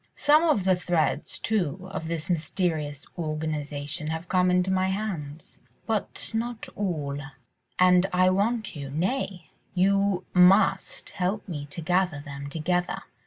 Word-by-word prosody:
Some 300 +2 +5
of 305 - +2
the 185 0 +4
threads, 170 -4 0
too, 185 -4 -1
of 160 -4 -4
this 165 0 -2
mysterious 160 -3 -1
organisation 150 -2 -3
have 160 +2 -3
fallen 180 0 +2
into 180 +1 +2
my 190 0 +2
hands, 180 -7 -4 0.3
but 220 -3 -1
not 230 +1 -3
all, 150 -8 -2 0.6
and 180 0 +5
I 185 0 +4
want 215 +2 0
you—nay! 165 - -3 0.2
you 195 0 +2
must 185 +3 +4
help 195 +2 -2
me 145 -5 -5
to 145 +4 -6
gather 180 -2 +1
them 140 -1 -7
together." 175 +4 -1
180 Hz, 130 wpm, -26 LUFS, 155-190 Hz, 0.6 s, Some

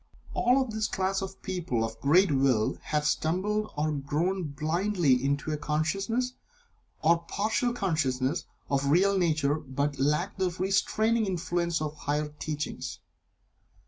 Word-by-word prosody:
All 250 +2 +3
of 260 -4 -1
this 215 -1 -1
class 190 0 -1
of 190 0 -7
people 170 -11 -1
of 115 0 -5
great 165 +5 +5
Will 130 -5 +2
have 150 -1 -1
stumbled 205 +8 0
or 155 +1 +1
grown 160 +6 -1
blindly 155 -2 +1
into 140 +2 0
a 150 - -1
consciousness 195 +12 -1 0.7
(or 165 +1 +5
partial 225 +6 0
consciousness) 155 - 0 0.2
of 140 -1 +1
the 140 - -1
real 195 +6 +4
nature, 155 -4 +2
but 140 0 -2
lack 150 +9 +1
the 185 -1 +2
restraining 205 +5 +1
influence 170 -2 -1
of 150 - -2
the 150 - -20
higher 150 +1 -1
teachings. 150 -1 -4
165 Hz, 145 wpm, -28 LUFS, 145-195 Hz, 0.7 s, great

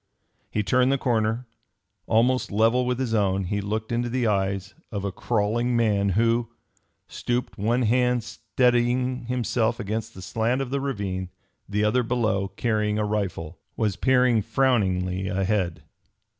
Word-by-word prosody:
He 105 - -1
turned 125 +4 +3
the 140 - +2
corner. 115 -1 0 0.6
Almost 125 +3 +2
level 115 +4 +3
with 125 -1 0
his 125 -3 -2
own, 100 -3 +1
he 100 +3 -2
looked 110 +3 -3
into 120 +1 0
the 125 0 0
eyes 100 -2 0 0.2
of 100 -2 -3
a 100 - -1
crawling 120 +4 0
man 105 -3 +2
who 115 0 +2 0.6
stooped, 120 0 -3
one 120 +5 +1
hand 125 +1 +2
steadying 125 +1 0
himself 120 -1 0
against 110 +1 -4
the 95 - -9
slant 115 +7 0
of 135 -2 -3
the 140 0 -1
ravine, 100 -9 -3 0.4
the 105 +1 0
other 110 +4 +3
below, 110 -5 0
carrying 105 -1 -1
a 105 - 0
rifle 95 -6 -3 0.2
was 105 -4 0
peering 125 +2 +3
frowningly 95 -7 +1
ahead. 95 -2 -1
110 Hz, 145 wpm, -25 LUFS, 100-125 Hz, 0.6 s, turned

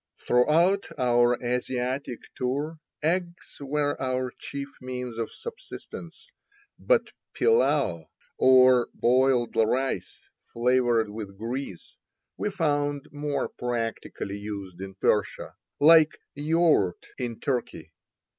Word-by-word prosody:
Throughout 165 +10 +3
our 120 -1 +3
Asiatic 125 +1 -2
tour 145 +6 -2 0.2
eggs 175 +2 -2
were 145 +1 -1
our 130 -1 -1
chief 140 0 -6
means 125 -2 -5
of 115 - -3
subsistence, 470 +1 -10 0.5
but - - +2 0.2
pillao, 140 - +2 0.3
or 130 -1 +6
boiled 125 -1 +2
rice 115 -4 0 0.3
flavored 120 -2 +2
with 105 -2 -8
grease, 115 -3 -6 0.4
we 210 - -2
found 145 -6 -1
more 145 -2 -2
particularly 115 -4 -4
used 100 -3 -7
in 95 0 -7
Persia, 105 +1 0 0.3
like 160 +1 +6 0.2
yaourt 150 - +2
in 120 -3 -4
Turkey. 125 -4 -3
130 Hz, 100 wpm, -26 LUFS, 115-145 Hz, 0.5 s, or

